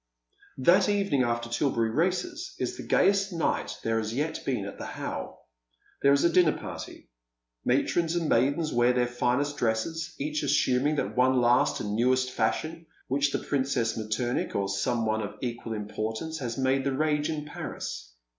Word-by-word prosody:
That 180 +9 +4
evening 200 -9 +2
after 120 -1 0
Tilberry 115 -2 0
races 185 - -1
is - - -2
the - - -7
gayest 195 0 +3
night 165 -2 -1
there 115 0 +1
haa 110 - -4
yet 145 +8 -2
been 125 -7 -1
at 100 - -8
the - - -5
How. - - -6 0.6
There 140 - +5
is 140 0 +4
a 170 - +4
dinner 175 -4 +4
party, - - -8 0.5
matrons 160 +6 +1
and 170 -2 0
maidens 145 +5 +2
wear 120 +1 +4
their 125 0 +2
finest 125 +4 0
dresses, 155 +9 -1
each 150 +2 -2
assuming 145 0 +2
that - - -2
one 130 +1 +4
last 120 0 +3
and 105 - -3
newest 130 +2 +2
fashion 160 +9 -1 0.2
which 140 +2 +2
the - - 0
Princess 130 -5 0
Mettemich, 115 +3 -2
or 100 -1 0
some 115 +4 0
one 110 0 0
of 105 -1 -5
equal 120 -2 -4
importance, 110 +8 -4
has 120 -4 -4
made 135 0 +2
the 140 0 0
rage 150 -1 +1
in 150 -2 -3
Paris. - - -6
130 Hz, 170 wpm, -28 LUFS, 115-155 Hz, 0.6 s, There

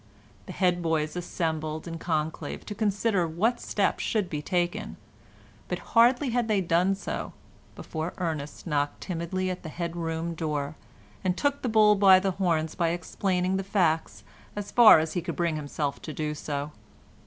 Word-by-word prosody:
The - - -6
head 180 -2 +1
boys 160 -2 0
assembled 160 -3 -3
in 165 -1 -6
conclave 160 -2 -3
to 210 - -5
consider 205 -3 +1
what 220 +10 0
steps 200 - 0
should 210 -5 -1
be 150 -2 -2
taken, 175 +1 -2 0.7
but - - -2 0.2
hardly 245 +3 +5
had 240 -1 +1
they 215 -3 +2
done 180 +2 +2
so 195 - -5 0.4
before 160 +2 -5
Ernest 155 -5 -4
knocked 145 -3 -1
timidly 185 +1 -2
at 180 - -6
the 160 - -7
head 170 +1 -4
room 165 0 -3
door 150 -2 -3 0.5
and 185 -1 0
took 285 -1 0
the 250 - -1
bull 215 -1 +6
by 195 -2 +7
the 190 0 0
horns 165 -4 0
by 170 -2 +1
explaining 180 +2 -1
the 195 - -2
facts 160 - 0 0.3
as 205 0 -5
far 235 -7 +9
as 155 0 -1
he 175 - -1
could 165 - -4
bring 170 -2 0
himself 145 -1 -3
to 155 - -6
do 150 +1 -2
so. 145 -1 -4
175 Hz, 170 wpm, -27 LUFS, 160-195 Hz, 0.7 s, far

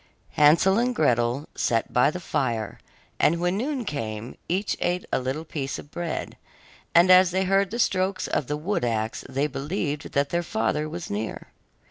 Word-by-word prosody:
Hansel 170 +7 +5
and 245 +1 0
Gretel 120 - +1
sat 115 -1 0
by 125 +3 +5
the 180 - -5
fire, 115 - -2 0.4
and 170 +2 +3
when 175 +2 +1
noon 255 +3 -2
came, 110 - -4
each 190 +4 0
ate 180 +1 -1
a - - +3
little 135 +5 -3
piece 140 -4 -4
of 145 - -11
bread, 170 -2 -4 0.6
and 175 +2 +7
as 185 0 +7
they 190 +1 0
heard 195 0 +2
the 230 - -4
strokes 185 -4 +1
of 130 - -1
the 150 - -2
wood 175 +1 -2
axe 110 -2 -1
they 135 +2 0
believed 145 +2 -3
that 140 0 +1
their 170 +3 0
father 150 +1 -1
was 170 +1 -6
near. 105 +2 -4
155 Hz, 175 wpm, -25 LUFS, 130-185 Hz, 0.6 s, and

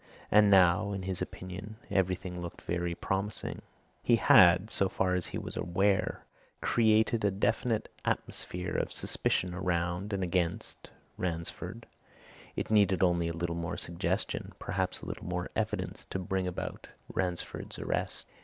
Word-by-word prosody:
And 105 0 +7
now, 95 +1 +5
in 95 -1 -3
his 95 -1 -3
opinion, 95 +4 -6 0.2
everything 90 -1 0
looked 85 -1 -7
very 85 0 -1
promising. 95 +3 -2 0.4
He 120 - +4
had 90 -1 +6
so 95 - +2
far 95 -1 +1
as 90 -1 0
he - - -4
was - - -4
aware 95 +3 +1 0.3
created 110 0 +3
a 100 - +4
definite 105 +3 0 0.2
atmosphere 90 0 -2
of - - 0
suspicion 90 -1 0
around 90 +2 -1
and 100 -1 -1
against 90 -1 -1 0.3
Ransford 85 -2 -4 0.7
it - - -3
needed 100 -3 +4
only 85 -2 +3
a 85 - -2
little 85 0 -1
more 85 -1 -3
suggestion, 85 0 -2
perhaps - - -2
a - - -8
little - - -6
more - - -3
evidence - - -2
to - - -4
bring 95 0 -1
about 90 - -5 0.3
Ransford's 90 -2 -3
arrest. - - -2
90 Hz, 145 wpm, -31 LUFS, 85-100 Hz, 0.7 s, And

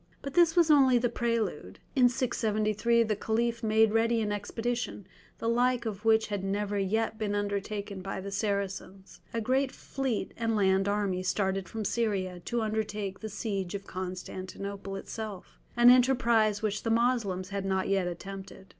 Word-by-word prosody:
But 275 - -5
this 340 -2 +5
was 335 -3 +5
only 265 -4 +6
the 240 0 +1
prelude; 225 - -2 0.2
in 250 -2 +6
673 230 -2 +1
the 215 -1 0
Caliph 230 +3 -1
made 220 0 +4
ready 230 +1 +3
an 210 -1 -1
expedition, 225 +1 -3 0.3
the 230 - -3
like 245 +1 +2
of 210 -2 -4
which 220 0 +4
had 205 -2 -2
never 205 +1 -1
yet 220 +3 0
been 205 -2 -1
undertaken 200 -1 -3
by 195 +1 -4
the 200 +1 -6
Saracens. 195 -1 -3
A 230 - -2
great 260 +4 +1
fleet 265 -5 -3
and 230 -1 0
land 195 -1 +3
army 200 -3 0
started 190 0 -1
from 220 -1 -4
Syria 195 -5 -1
to 235 -1 -1
undertake 210 -2 -3
the 220 - -6
siege 200 -3 -3
of 200 0 -6
Constantinople 185 +2 -6
itself, 205 -1 -7 0.2
an 240 +1 +8
enterprise 235 -5 +3
which 210 -1 -1
the 225 - -2
Moslems 225 -6 +1
had 200 -1 -3
not 190 -1 0
yet 195 -2 +1
attempted. 190 +2 -8
210 Hz, 165 wpm, -29 LUFS, 195-230 Hz, 0.3 s, an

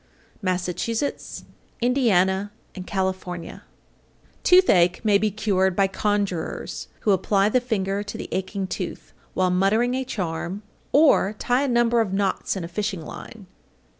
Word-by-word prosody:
Massachusetts, 185 +7 -2 0.4
Indiana, 205 -6 +2 0.2
and 185 -2 -8
California. 185 -3 -3 0.8
831. 360 - +6
Toothache 180 - -17
may 205 -2 +4
be 215 - +1
cured 190 -3 +1
by 195 - +4
conjurers, 195 -3 -2
who 210 - +2
apply 195 +1 +2
the 255 +3 +2
finger 200 -5 -1
to 205 - -6
the - - -6
aching 190 +1 -2
tooth, - - -6 0.2
while 185 -1 +2
muttering 210 +7 +2
a 260 +1 -1
charm, 185 -3 -4 0.3
or 280 -9 +4
tie 245 +4 +1
a - - -1
number 240 -1 +3
of 200 -4 -2
knots 195 0 0
in 190 - -4
a - - -4
fishing 190 -1 -3
line. 215 -4 -10
200 Hz, 140 wpm, -24 LUFS, 185-225 Hz, 0.8 s, 831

